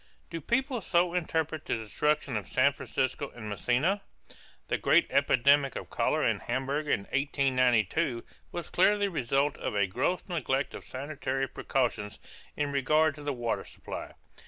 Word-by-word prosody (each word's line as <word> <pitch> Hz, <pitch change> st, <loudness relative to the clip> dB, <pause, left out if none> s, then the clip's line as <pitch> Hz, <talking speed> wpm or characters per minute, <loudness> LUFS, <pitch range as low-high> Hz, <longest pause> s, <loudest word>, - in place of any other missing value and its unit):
Do 165 Hz, -1 st, -4 dB
people 260 Hz, -, 0 dB
so 175 Hz, -1 st, +2 dB
interpret 160 Hz, -3 st, -1 dB
the -, -, 0 dB
destruction 130 Hz, +4 st, 0 dB
of 105 Hz, -, -3 dB
San 140 Hz, +2 st, +3 dB
Francisco 135 Hz, +2 st, -2 dB
and 110 Hz, -3 st, -7 dB
Messina? 130 Hz, -, +1 dB, 0.7 s
The -, -, 0 dB
great -, -, +4 dB
epidemic 140 Hz, +2 st, +4 dB
of -, -, -6 dB
cholera -, -, +1 dB
in -, -, +1 dB
Hamburg 135 Hz, +5 st, -2 dB
in 100 Hz, -, +2 dB
1892 130 Hz, -, +1 dB, 0.3 s
was 175 Hz, -, -6 dB
clearly 205 Hz, +3 st, +4 dB
the 200 Hz, -, -2 dB
result 140 Hz, -1 st, 0 dB
of -, -, -3 dB
a 100 Hz, -1 st, +3 dB
gross 135 Hz, -, -1 dB
neglect 145 Hz, -6 st, -1 dB
of -, -, -8 dB
sanitary 135 Hz, -1 st, -3 dB
precautions 115 Hz, -8 st, -1 dB, 0.4 s
in 145 Hz, -1 st, 0 dB
regard 155 Hz, +3 st, +3 dB
to 150 Hz, -, -11 dB
the 145 Hz, 0 st, -2 dB
water 120 Hz, -2 st, -2 dB
supply. -, -, -8 dB
140 Hz, 155 wpm, -29 LUFS, 125-155 Hz, 0.7 s, great